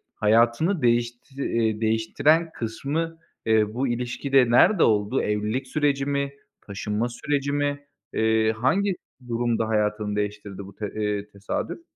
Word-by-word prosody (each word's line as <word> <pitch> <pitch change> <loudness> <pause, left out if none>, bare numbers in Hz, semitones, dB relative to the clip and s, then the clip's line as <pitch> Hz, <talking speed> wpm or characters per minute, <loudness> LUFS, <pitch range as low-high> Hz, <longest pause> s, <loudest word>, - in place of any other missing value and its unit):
hayatını 115 - +3
değişti, 120 +3 0
eee, 110 -1 0
değiştiren 130 +9 +2
kısmı, 155 +8 -3 0.3
eee, 110 -1 +2
bu 130 +3 -1
ilişkide 125 +1 +1
nerede 175 - +5
oldu? 105 +4 +2
Evlilik 105 +5 -1
süreci 140 -1 +1
mi? 140 0 -1 0.3
Taşınma 105 +3 -2
süreci 140 +3 -2
mi? 145 0 -1 0.3
Eee, 110 0 +2
hangi 185 - +1 0.3
durumda 115 -1 0
hayatını 105 -1 0
değiştirdi 105 -1 -4
bu 100 - -13
te 105 -2 -5
eee, 105 -1 -2
tesadüf? 100 - -4
115 Hz, 125 wpm, -25 LUFS, 105-140 Hz, 0.3 s, nerede